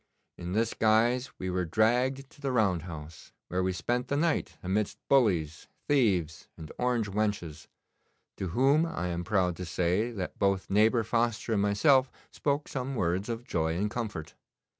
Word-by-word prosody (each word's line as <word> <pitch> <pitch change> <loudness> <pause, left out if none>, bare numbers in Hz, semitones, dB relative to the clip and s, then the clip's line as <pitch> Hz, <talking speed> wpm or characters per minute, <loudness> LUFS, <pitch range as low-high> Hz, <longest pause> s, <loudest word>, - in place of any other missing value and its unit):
In 90 +1 -6
this 115 +2 +1
guise 115 +4 +2
we 95 0 -3
were 90 0 0
dragged 125 +9 +1
to - - -19
the 135 -2 -1
round 100 -8 +2
house, 80 0 -10 0.2
where 90 +1 0
we 95 0 +1
spent 120 +7 -2
the 140 - 0
night 160 +1 0
amidst 100 +3 -1
bullies, 90 - +2 0.2
thieves, 95 - +1
and 80 -1 -9
orange 125 -3 +1
wenches, 95 -7 -2 0.7
to 95 - -3
whom 135 - +3
I 155 - -3
am 85 0 -3
proud 90 -4 +1
to 90 - -5
say 90 +6 0
that 100 -6 -6
both 100 -1 0
neighbour 110 +3 +4
Foster 115 0 0
and 100 - +2
myself 130 +6 +4 0.2
spoke 145 0 -1
some 130 0 -4
words 95 +1 -1
of 115 0 -3
joy 80 -4 -1
and 105 +3 -1
comfort. 110 -10 -5
105 Hz, 165 wpm, -29 LUFS, 90-125 Hz, 0.7 s, neighbour